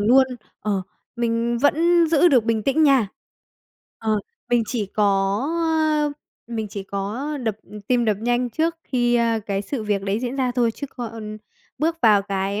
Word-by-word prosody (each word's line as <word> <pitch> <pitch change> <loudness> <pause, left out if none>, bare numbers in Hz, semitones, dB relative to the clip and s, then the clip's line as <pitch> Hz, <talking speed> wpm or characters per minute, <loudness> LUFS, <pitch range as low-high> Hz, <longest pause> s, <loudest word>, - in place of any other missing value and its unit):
luôn, 255 +6 +5 0.3
ờ, 200 -3 -1 0.3
mình 235 0 0
vẫn 335 +4 +4
giữ 330 +2 +5
được 250 -7 +4
bình 225 -2 0
tĩnh 275 +6 +2
nha. 270 -9 +4 0.9
Ờ, 215 -2 0 0.3
mình 240 -1 +4
chỉ 225 -5 -2
có, 210 +2 0 0.6
ơ, 310 -2 +1 0.4
mình 220 -2 -2
chỉ 200 0 -6
có 200 +9 -4
đập 220 -3 -1 0.3
tim 245 -2 +3
đập 215 -3 +2
nhanh 240 +1 0
trước 325 +7 0
khi, 240 -2 +1
ơ, 230 -1 +1
cái 200 0 -1
sự 250 +1 -4
việc 205 -2 -1
đấy 200 +2 -1
diễn 255 +2 -3
ra 255 -2 +1
thôi 240 -2 +2
chứ 285 - -6
còn 225 -3 -7 0.4
bước 330 +2 +1
vào 210 -3 +6
cái, 195 +1 -2
235 Hz, 170 wpm, -22 LUFS, 210-275 Hz, 0.9 s, vào